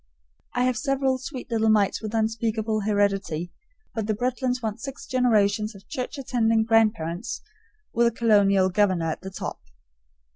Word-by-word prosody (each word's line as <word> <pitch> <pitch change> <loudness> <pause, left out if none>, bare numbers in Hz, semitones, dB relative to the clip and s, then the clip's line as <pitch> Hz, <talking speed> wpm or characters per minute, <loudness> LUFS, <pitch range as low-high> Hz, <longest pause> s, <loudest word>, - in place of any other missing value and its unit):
I 245 - +2
have 250 -2 +1
several 270 -2 +1
sweet 265 -2 -7
little 220 -1 +2
mites 210 -2 +3
with 220 0 -4
unspeakable 220 0 0
heredity, 195 -5 0 0.4
but 220 -2 -3
the 215 - +1
Bretlands 250 +2 -1
want 220 -2 -4
six 275 -1 -7
generations 215 -4 +2
of 195 - -15
church 255 +3 -4
attending 230 -4 +2
grandparents, 220 -4 +1 0.5
with 235 +1 +4
a - - +2
colonial 205 -4 +4
governor 185 -4 +2
at - - -6
the 190 - -6
top. 190 - -6
220 Hz, 150 wpm, -25 LUFS, 205-245 Hz, 0.5 s, with